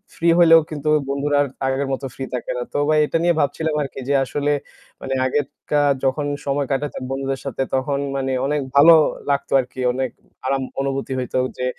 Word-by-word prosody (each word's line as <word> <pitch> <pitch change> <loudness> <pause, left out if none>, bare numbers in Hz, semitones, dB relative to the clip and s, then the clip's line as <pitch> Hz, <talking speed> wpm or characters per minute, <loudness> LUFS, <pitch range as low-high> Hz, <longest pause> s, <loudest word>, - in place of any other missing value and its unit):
free 165 0 +3
হলেও 165 -1 +8
কিন্তু 150 0 -3 0.2
বন্ধুরা 145 +1 0
আর 145 - +1 0.3
আগের 135 +1 -1
মতো 135 +1 -4
free 135 - -5
থাকে 125 - -3
না। 120 - -2
তো - - -1
ভাই 155 0 +4
এটা 165 - 0
নিয়ে 175 0 +4
ভাবছিলাম 155 +2 0
আর 140 - -2
কি - - -7
যে - - +3
আসলে, 145 +2 -1 0.5
মানে 135 - -3
আগের 140 +2 +1 0.3
কা 145 -1 +4 0.2
যখন 145 +2 0 0.2
সময় 140 -1 0
কাটাতাম 135 -1 -2
বন্ধুদের 135 0 -2
সাথে 135 0 -2
তখন 140 +1 0 0.2
মানে 135 -1 -1
অনেক 145 0 0
ভালো 160 +4 +9 0.4
লাগত 140 0 0
আর 125 - 0
কি। 130 - -11
অনেক 130 -1 -1 0.4
আরাম 135 0 0 0.2
অনুভূতি 135 -1 -2
হইত 125 -1 -4 0.2
যে 125 - -2
140 Hz, 200 wpm, -21 LUFS, 135-145 Hz, 0.5 s, ভালো